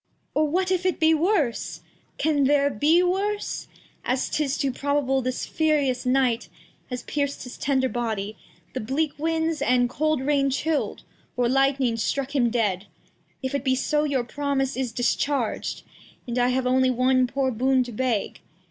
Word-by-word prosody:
Or, 305 0 +2
what 365 +4 0
if 365 -1 +1
it 370 -1 0
be 320 0 +5
worse? 320 - 0 0.4
As 315 - +2 0.7
'tis 285 -2 0
too 275 -2 0
probable, 275 0 0
this 255 0 -2
furious 285 -6 +1
Night 250 -3 +1 0.4
Has 250 -1 -5
pierc'd 285 -1 -2
his 250 - -8
tender 265 -1 +1
Body, 220 -4 -3 0.4
the - - -2
bleak 280 +7 -1
Winds, 320 -1 0
And 245 -3 +2
cold 310 0 0
Rain 275 0 +2
chill'd, 295 +3 -1 0.3
or 245 -1 +2
Lightning 270 -2 +2
struck 275 +4 -2
him 240 -4 +3
dead; 210 -5 0 0.6
If 260 - -2
it 280 -2 -1
be 260 -1 +2
so, 295 +3 +1
your 280 -4 0
Promise 275 +1 -1
is 255 -2 -2
discharg'd, 245 +1 -1 0.4
And 240 0 -2
I 245 - +3
have 255 +1 0
only 260 +1 +3
one 255 +1 +3
poor 265 +1 0
Boon 255 +2 +2
to 245 - -8
beg. 235 -2 -1
270 Hz, 150 wpm, -25 LUFS, 250-295 Hz, 0.7 s, be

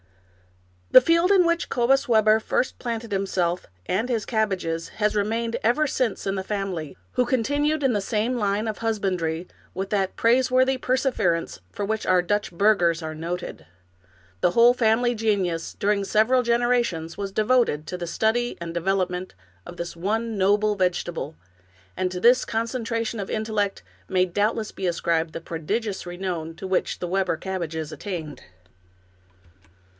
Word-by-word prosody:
The - - +10
field 335 +7 +3
in 375 -3 +5
which 335 0 0
Cobus 255 +2 +2
Webber 220 -1 +5
first 250 - -1
planted 230 -2 -4
himself 185 -2 -1 0.2
and 220 +7 -1
his 230 -4 -1
cabbages 190 -7 -1
had 210 -1 0
remained 225 +3 -1
ever 245 +7 +3
since 255 -6 -1
in 195 - 0
the 190 - -3
family, 190 - -4 0.2
who 250 - +2
continued 290 +5 0
in 265 -2 +3
the 205 - 0
same 220 +5 -1
line 210 -1 0
of 215 - -4
husbandry 185 -7 -1 0.3
with 195 +1 -4
that 195 -2 0
praise 250 +3 +3
worthy 260 +1 +3
perseverance 250 - 0
for 205 - -3
which 220 +1 -2
our 185 -1 +4
Dutch 205 +2 -1
burghers 175 -3 +2
are 155 0 -4
noted. 165 - -5 0.7
The 175 - +3
whole 235 +5 +6
family 240 0 +2
genius, 195 -7 -1
during 200 0 +1
several 220 +6 +3
genera 240 +1 +2
tions, 165 -6 -5
was 200 -1 -4
devoted 215 -8 +2
to 180 - -4
the 175 -1 -5
study 225 +6 0
and 170 -1 -5
development 180 - -1 0.3
of 175 - -9
this 170 0 -5
one 220 +6 -1
noble 205 +2 +2
vegetable, 175 -4 -2 0.6
and 185 -1 -1
to 180 - -4
this 245 +6 +5
concentration 230 0 -2
of 195 - -4
intellect 215 -2 -1 0.3
may 185 -1 +3
doubtless 210 +4 -1
be 190 - -3
ascribed 165 -1 0
the 165 - -6
prodigious 190 +6 -3
renown 175 -3 -4
to 190 - -7
which 185 -1 0
the 175 - -3
Webber 190 -2 0
cabbages 165 -5 -4
attained. 165 -8 -6
205 Hz, 155 wpm, -24 LUFS, 180-230 Hz, 0.7 s, The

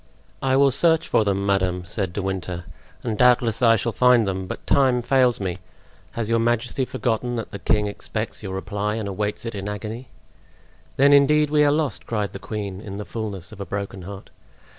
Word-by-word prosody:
"I 130 -1 +2
will 140 0 +5
search 160 +4 +3
for - - +3
them, 100 -1 0
madame," 95 -2 0
said 95 0 -1
De 100 +2 -4
Winter 90 -2 -4 0.4
"and 110 - -2
doubtless 120 -1 +3
I 115 -2 +6
shall 115 +2 -1
find 125 -1 +4
them; 95 -1 -3
but - - -7
time 130 -3 +3
fails 125 -2 +3
me. 90 -3 -3 0.6
Has 115 -2 -2
your 115 0 +2
majesty 120 +3 0
forgotten 120 0 -2
that 115 - -5
the 100 - -6
king 105 +2 +1
expects 110 +2 -4
your 95 -3 -5
reply 105 +2 -2
and 110 -2 -3
awaits 105 +3 -3
it 115 - -4
in 100 0 -4
agony?" 110 +5 -6 0.9
"Then 140 +2 +6
indeed 150 +1 +4
we 150 -1 +4
are 145 - +4
lost!" 150 -5 -1
cried 105 -3 -2
the 100 - -6
queen, 100 -3 -5
in 100 -2 -7
the 105 - -5
fullness 100 -1 -5
of 110 - -12
a - - -1
broken 100 0 -5
heart. 100 +2 -9
110 Hz, 200 wpm, -23 LUFS, 100-125 Hz, 0.9 s, I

